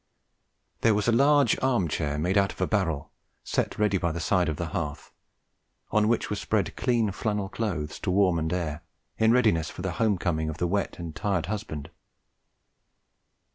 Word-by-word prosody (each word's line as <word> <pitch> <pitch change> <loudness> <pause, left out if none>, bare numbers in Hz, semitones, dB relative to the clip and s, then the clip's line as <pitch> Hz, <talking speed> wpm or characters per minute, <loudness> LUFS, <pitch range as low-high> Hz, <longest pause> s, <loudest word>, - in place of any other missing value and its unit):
There 115 -2 +4
was 105 +1 0
a - - +5
large 140 +4 +4
arm 120 -9 +2
chair 75 -1 -2
made 90 +6 0
out 100 -1 +3
of - - -13
a - - +2
barrel 85 -9 -1 0.3
set - - -1
ready 105 -3 +2
by 85 -2 0
the 85 - -4
side 90 0 +2
of 75 - -3
the 85 0 -3
hearth, 75 -2 -4 0.8
on 105 0 +3
which 115 +1 +1
were 105 - -2
spread 100 -1 -1
clean 120 -4 +1
flannel 105 0 -2
clothes 90 -9 -3
to 100 - -3
warm 90 -2 +3
and 80 0 -2
air, 85 -3 -2 0.4
in 110 0 +5
readiness 110 -11 +3
for 90 - -8
the 95 - -1
home 105 -4 +3
coming 80 -3 -1
of 80 - -5
the 90 - 0
wet 100 +3 -1
and 85 -2 -7
tired 95 -5 -1
husband. 85 -7 -5
95 Hz, 185 wpm, -27 LUFS, 80-105 Hz, 0.8 s, a